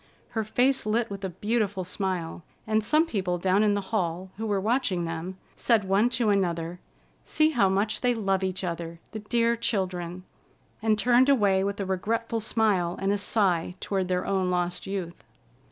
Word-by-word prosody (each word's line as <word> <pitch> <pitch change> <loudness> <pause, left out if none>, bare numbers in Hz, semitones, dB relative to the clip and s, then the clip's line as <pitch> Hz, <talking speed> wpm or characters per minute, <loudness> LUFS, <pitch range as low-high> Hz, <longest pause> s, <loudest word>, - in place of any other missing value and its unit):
Her 220 -1 -2
face 250 +3 +1
lit 225 0 0
with 200 0 -6
a 190 - -1
beautiful 205 0 -1
smile, 180 -3 -3 0.2
and 215 0 +1
some 305 +9 +3
people 185 - -1
down 185 +3 +2
in 210 -1 +3
the 200 0 -5
hall, 185 -2 -1
who 220 +1 -3
were 205 -2 +1
watching 205 -5 0
them, 165 +3 -5 0.2
said 230 -4 +2
one 195 +5 +2
to 235 -3 +2
another: 175 -3 -1 0.4
"See 310 0 +2
how 230 -9 +3
much 205 +3 0
they 245 -1 +2
love 195 -3 0
each 185 0 -2
other, 170 -1 -4
the 220 - -5
dear 235 +2 +1
children!" 185 -5 -2 0.6
and 215 -1 +2
turned 245 +4 +4
away 200 -8 +3
with 200 +1 -2
a 200 - -1
regretful 225 +5 -1
smile 205 -6 +1
and 195 +1 +1
a - - +1
sigh 185 -4 +1
toward 190 -2 -1
their 180 0 -1
own 190 -2 0
lost 180 +1 -1
youth. 185 -3 -5
195 Hz, 180 wpm, -27 LUFS, 185-220 Hz, 0.6 s, turned